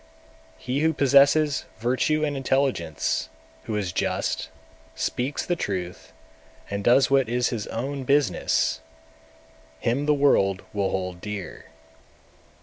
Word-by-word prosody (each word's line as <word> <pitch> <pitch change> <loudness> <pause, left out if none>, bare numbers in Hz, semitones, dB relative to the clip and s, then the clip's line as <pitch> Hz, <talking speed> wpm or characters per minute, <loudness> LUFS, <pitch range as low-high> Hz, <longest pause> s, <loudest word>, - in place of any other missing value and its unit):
217. - - -19
He - - +2
who 160 +1 +3
possesses 140 +1 +4
virtue 130 +7 +1
and 145 -1 -2
intelligence, 130 - 0 0.4
who 110 - -3
is 100 -4 -2
just, 75 - -1 0.5
speaks 130 +4 -2
the 175 - 0
truth, 90 - -4 0.6
and 100 0 -3
does 125 +4 +4
what 135 -4 +3
is 125 +1 +1
his 110 -4 -4
own 135 +4 -4
business, 130 - +1 1.0
him 130 - 0
the 150 - +5
world 100 -9 +2
will 100 -2 0
hold 90 -2 -4
dear. 105 -3 -7
125 Hz, 125 wpm, -25 LUFS, 100-140 Hz, 1.0 s, the